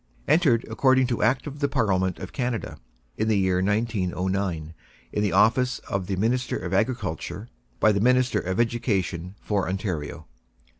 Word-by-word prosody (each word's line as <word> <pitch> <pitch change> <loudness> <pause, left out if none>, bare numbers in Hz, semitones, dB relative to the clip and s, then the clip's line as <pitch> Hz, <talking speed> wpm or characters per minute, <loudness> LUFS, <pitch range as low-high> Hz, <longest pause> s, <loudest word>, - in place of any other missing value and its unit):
Entered, 145 -7 +3
according 130 +3 +3
to 120 -2 -2
Act 125 +3 +2
of 145 -1 -7
the 140 - +2
Parliament 95 -9 +1
of 95 - -8
Canada, 115 - -3 0.4
in 110 - 0
the 110 -2 +3
year 95 -1 +2
1909, 95 -5 -1 0.4
in 105 - 0
the 105 -2 +1
office 115 +5 +3
of 95 -2 -2
the 95 - -1
Minister 120 +6 0
of 90 - -5
Agriculture 110 -1 -2 0.3
by 110 - +5
the 100 -1 0
Minister 125 +2 +3
of 95 +3 -3
Education 100 -6 -1
for 100 -3 0
Ontario. 90 -5 -4
105 Hz, 155 wpm, -25 LUFS, 95-125 Hz, 0.4 s, by